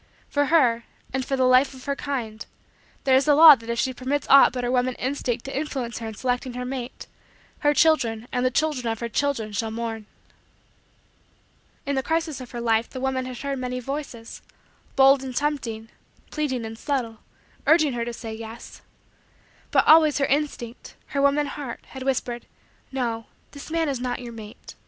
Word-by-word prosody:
For 285 0 +1
her, 255 -7 +3 0.3
and 265 0 -1
for 270 - -1
the 260 - +1
Life 255 +2 +4
of 260 - -13
her 280 -1 -1
kind, 235 -7 -4 0.6
there 265 -1 +4
is 265 - +4
the 295 -1 +5
law 315 0 +11
that 230 -4 -5
if 235 - -1
she 260 +2 0
permits 265 +3 -2
aught 275 0 +8
but 250 -1 -4
her 245 - 0
woman 250 0 +1
instinct 255 -3 -2
to 270 - -6
influence 265 -5 -3
her 225 - -5
in 220 - -7
selecting 250 +2 -2
her 250 0 -4
mate 255 -1 -6 0.5
her 295 - +3
children 245 -9 +2
and 250 - 0
the 255 - +3
children 275 -2 0
of 225 - -4
her 235 - -3
children 230 -3 -1
shall 220 +2 -2
mourn. 225 -1 -5 1.8
In 280 - -1
the 265 - +1
crisis 320 -1 -2
of 250 - -9
her 240 - -6
life 230 0 +1
the 260 - -7
woman 260 0 -1
had 255 -1 -7
heard 275 0 -3
many 250 0 -3
voices 255 -3 -6 0.5
bold 270 0 +6
and 260 -2 -6
tempting, 240 -7 -2 0.4
pleading 260 -6 -2
and 225 0 -8
subtle 245 -7 -2 0.5
urging 310 -4 +5
her 235 -1 -2
to 240 - -4
say: 225 -1 -7
"Yes." 225 +1 -9 0.9
But - - +3
always 310 -1 +6
her 280 - +2
instinct 275 -5 -3
her 280 - -1
woman 280 +1 +3
heart 280 -3 -6
had 265 - -9
whispered: 255 -2 -2 0.4
"No. 235 -4 -2 0.2
This 285 +1 -10
man 325 0 0
is 275 -3 -2
not 250 0 -2
your 240 -2 -8
mate. 215 -2 -11
255 Hz, 190 wpm, -24 LUFS, 235-280 Hz, 1.8 s, law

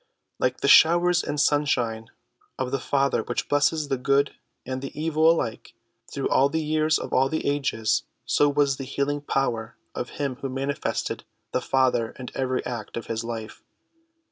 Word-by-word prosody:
Like - - 0
the - - +1
showers 175 +2 +6
and 145 - -3
sunshine 125 -7 +1 0.5
of 130 -1 -2
the 135 - 0
Father 140 +1 +1
which - - -3
bless 145 0 +4
the 150 -4 -2
good 140 +2 +2 0.3
and 130 0 -4
the 135 +2 -7
evil 160 0 +3
alike 120 -9 -1 0.4
through - - -2
all 135 +1 +3
the 160 - -1
years 155 0 +2
of - - -6
all 135 +1 +3
the 160 - -2
ages, 135 -6 +1 0.2
so 145 - +3
was 140 -1 +2
the 135 - -5
healing 140 +2 -2
power 120 -5 -2 0.2
of 125 - -4
him 140 -3 -2
who 135 0 -4
manifested 135 +2 -3 0.3
the - - 0
Father 130 -4 +1
in 125 -1 -7
every 130 -1 -1
act 120 -3 -5
of 115 - -5
his 115 0 -3
life. 115 -2 -6
135 Hz, 170 wpm, -25 LUFS, 125-145 Hz, 0.5 s, showers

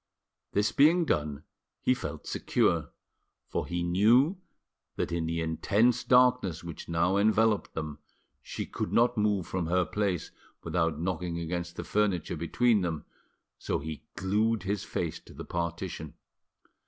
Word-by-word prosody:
This 105 +1 +2
being 165 +5 +5
done, 75 - -1 0.4
he 130 - +3
felt - - -6
secure, - - +1 0.6
for - - -2
he 85 0 -2
knew 115 - +4 0.6
that - - -2
in 85 -1 -1
the 85 0 -1
intense 105 +9 +2
darkness 125 -10 +3
which 85 -1 -8
now 85 +3 +2
enveloped 110 0 +2
them 75 -2 -4 0.4
she - - -5
could - - -4
not 120 +1 +3
move 105 -4 +1
from 90 -3 -2
her 90 +1 +2
place 95 0 -1 0.3
without 80 -3 0
knocking 85 0 -2
against 85 +1 -4
the - - -5
furniture 100 -6 0
between 105 +7 +2
them, 85 -4 -3 0.5
so - - -1
he 80 +1 -6
glued 105 +2 +1
his 100 +1 -2
face 85 -7 -3
to - - -16
the - - -7
partition. 85 -2 -4
90 Hz, 140 wpm, -29 LUFS, 85-110 Hz, 0.6 s, being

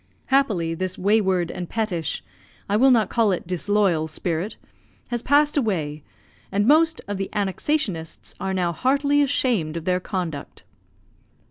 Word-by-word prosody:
Happily, 200 -12 +2
this 185 +2 -3
wayward 190 -3 +2
and 175 -2 -6
pettish, 190 -9 -2 0.4
I 200 - 0
will 260 +5 +5
not 225 -6 +3
call 225 -3 +3
it 180 - -2
disloyal 180 -2 +1
spirit, 165 +5 -3 0.5
has 240 -1 -2
passed 295 +3 +3
away, 160 - -1 0.5
and 205 +1 +1
most 320 +4 +4
of 205 -1 -3
the 195 0 -3
"Annexationists" 200 - -2
are 190 0 -2
now 175 -2 +1
heartily 280 - +2
ashamed 225 - +1
of 165 - -6
their 180 0 +1
conduct. 175 -6 -5
195 Hz, 140 wpm, -23 LUFS, 175-240 Hz, 0.5 s, will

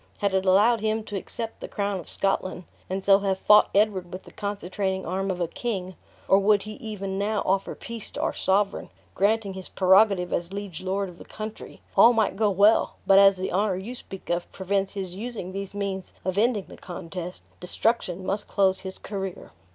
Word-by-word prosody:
Had 200 -1 0
it 190 0 +1
allowed 210 +5 +5
him 220 0 0
to 205 - -7
accept 225 +3 -5
the - - -5
crown 200 -1 -2
of 175 - -10
Scotland, 185 -2 -1 0.3
and 190 +1 -2
so 195 0 +6
have 195 -1 0
fought 210 +2 +6
Edward 195 -4 +2
with 185 +1 -7
the - - -14
concentrating 195 -1 -3
arm 190 +3 -2
of 185 -1 -2
a 175 - 0
king; 185 -4 -4 0.3
or 195 - +6
would 200 0 +3
he 215 - -7
even 195 -3 -4
now 210 +1 0
offer 195 +1 0
peace 230 -2 -7
to - - -5
our - - 0
sovereign, 195 +1 0 0.2
granting 205 0 +1
his 190 -1 -7
prerogative 190 -1 +4
as 170 +1 -2
liege 200 -4 -6
lord 195 +1 -1
of 180 -1 -12
the - - -9
country, 215 0 -8
all 235 - +8
might 220 -4 +1
go 215 +1 +2
well; 205 +3 +4
but 195 0 +7
as 195 -1 +6
the 185 - -3
honor 195 +1 +1
you 195 +7 -6
speak 195 -7 -8
of 175 0 -2
prevents 195 +1 -1
his 190 -3 -4
using 210 -2 -6
these 195 +1 -6
means 195 -2 -4
of 185 -1 -1
ending 215 -1 +2
the - - -12
contest, 180 0 -7 0.2
destruction 185 -1 -1
must 200 +2 -2
close 190 -2 +2
his 190 0 -7
career." 195 - -6
195 Hz, 200 wpm, -26 LUFS, 185-210 Hz, 0.3 s, all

